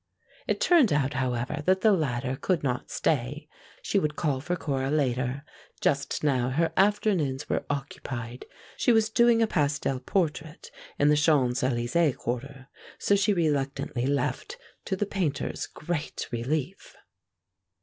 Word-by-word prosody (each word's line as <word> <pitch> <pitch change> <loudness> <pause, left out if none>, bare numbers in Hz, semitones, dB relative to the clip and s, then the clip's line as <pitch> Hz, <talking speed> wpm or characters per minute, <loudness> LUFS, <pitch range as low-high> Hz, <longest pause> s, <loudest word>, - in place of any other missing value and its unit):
It - - 0
turned 345 - +5
out, 145 -1 +1
however, 130 +2 -2
that 190 0 +3
the 215 - +5
latter 135 -7 0
could 160 +3 -1
not 125 -3 -2
stay. 145 +1 -1 0.4
She 200 - +1
would 150 -4 -1
call 140 -6 -1
for 175 +5 -2
Cora 135 -5 -2
later; 135 -1 0 0.3
just 140 +1 0
now 130 -4 +2
her 165 +5 0
afternoons 190 -9 +1
were - - -2
occupied. 130 -4 -5 0.3
She - - +3
was 220 -1 +3
doing 235 0 +4
a - - +5
pastel 145 -6 0
portrait 155 +1 -2 0.3
in 145 - +4
the 150 - +5
Champs 145 -5 +2
Elysées 130 +5 +1
quarter, 135 +2 -5 0.3
so 200 - +2
she 200 +1 +2
reluctantly 140 -7 -1
left, 145 - -2 0.3
to 190 - -1
the 205 - -1
Painter's 180 -8 -2
great 155 -1 -4
relief. 140 +9 -3
145 Hz, 140 wpm, -27 LUFS, 130-175 Hz, 0.4 s, turned